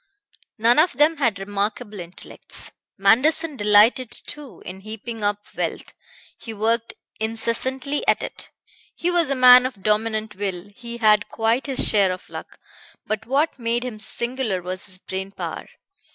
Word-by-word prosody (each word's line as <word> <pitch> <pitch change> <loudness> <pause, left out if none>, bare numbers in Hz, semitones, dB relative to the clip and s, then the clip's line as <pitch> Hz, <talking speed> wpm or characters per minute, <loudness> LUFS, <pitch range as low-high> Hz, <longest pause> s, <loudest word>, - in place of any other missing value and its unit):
None 235 +5 +4
of 335 +4 +4
them 300 +5 +3
had 235 -8 +1
remarkable 205 +2 -3
intellects. 175 +1 -8 0.3
Manderson 275 +10 +3
delighted 210 +3 +4
too 285 +3 -7
in 185 +1 -8
heaping 220 +2 -8
up 205 0 -1
wealth; - - -4 0.5
he 225 -2 -8
worked 225 +2 -1 0.2
incessantly 235 +6 0
at - - +3
it; - - -6 0.5
he 350 - -1
was 340 -4 +2
a 275 - +1
man 250 -1 +8
of 210 -7 -12
dominant 215 +1 0
will; 195 -1 -5
he 235 0 -8
had 215 -2 +3
quite 230 +5 0
his 270 -2 +3
share 200 -3 +3
of 185 - -7
luck; - - -9 0.5
but 215 +1 -3
what 280 +3 0
made 235 +1 -1
him 230 -4 -6
singular 235 -2 -1
was 185 +2 -5
his 185 -1 +2
brain 190 +1 -6
power. 195 - -7
225 Hz, 150 wpm, -22 LUFS, 205-255 Hz, 0.5 s, man